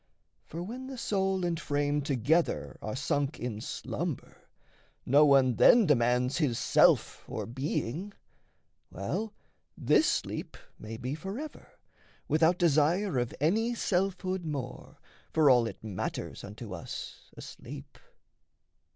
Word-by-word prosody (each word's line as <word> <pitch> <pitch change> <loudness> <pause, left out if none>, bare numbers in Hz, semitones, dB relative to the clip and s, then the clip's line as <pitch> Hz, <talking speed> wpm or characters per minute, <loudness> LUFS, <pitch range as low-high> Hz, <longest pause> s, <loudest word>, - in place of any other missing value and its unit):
For 170 +2 -6
when 250 +7 -7
the 265 -1 -7
soul 190 -4 0
and 170 -1 -1
frame 145 -1 0
together 145 +4 0
are 110 - -4
sunk 145 +1 -1
In 110 -3 -4
slumber, - - -5 0.6
no 145 +4 +6
one 130 -4 +4
then 235 - +7
demands 125 -1 +2
his 135 -8 +1
self - - +3
Or - - -4
being. 140 - -3 0.8
Well, 185 - -3 0.5
this - - +3
sleep - - -2 0.2
may 110 +1 -7
be 125 +4 -4
forever, 200 - -7 0.5
Without 160 +3 +3
desire 165 0 +2
of 120 -1 -2
any 220 - +1
selfhood 185 -2 -1
more, 140 -5 -6 0.4
For 150 -3 +5
all 120 -2 +4
it - - -9
matters 105 -4 -5
unto 105 0 -8
us 85 - -8
asleep. 65 - -10
150 Hz, 120 wpm, -30 LUFS, 125-185 Hz, 0.8 s, then